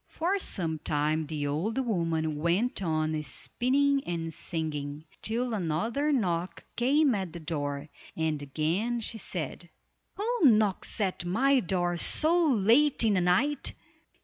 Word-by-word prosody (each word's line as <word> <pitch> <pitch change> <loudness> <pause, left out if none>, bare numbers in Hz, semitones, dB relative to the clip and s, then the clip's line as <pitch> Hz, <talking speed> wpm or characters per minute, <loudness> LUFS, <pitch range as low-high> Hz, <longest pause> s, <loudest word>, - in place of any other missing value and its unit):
For 365 +5 -1
some 165 - -2
time 155 +1 0
the 150 -2 -3
old 160 - -1
woman 165 - 0
went 180 +10 0
on 155 -3 0
spinning 270 - +1
and 165 -2 -3
singing, 150 -2 -4 0.2
till 235 +2 -1
another 220 - 0
knock 180 -9 -1
came 275 +3 +3
at 190 -5 -3
the 170 - -6
door, 145 -3 -3 0.3
and 160 -2 -1
again 165 - -1
she 225 +1 -4
said: 175 -2 -4 0.5
"Who 470 +4 -1
knocks 215 -4 +3
at 190 -4 -1
my 260 +10 +3
door 175 -4 -1
so 330 - +2
late 250 +4 +4
in 220 -2 +3
the 185 - +2
night?" 195 +12 +1
180 Hz, 135 wpm, -29 LUFS, 160-245 Hz, 0.5 s, late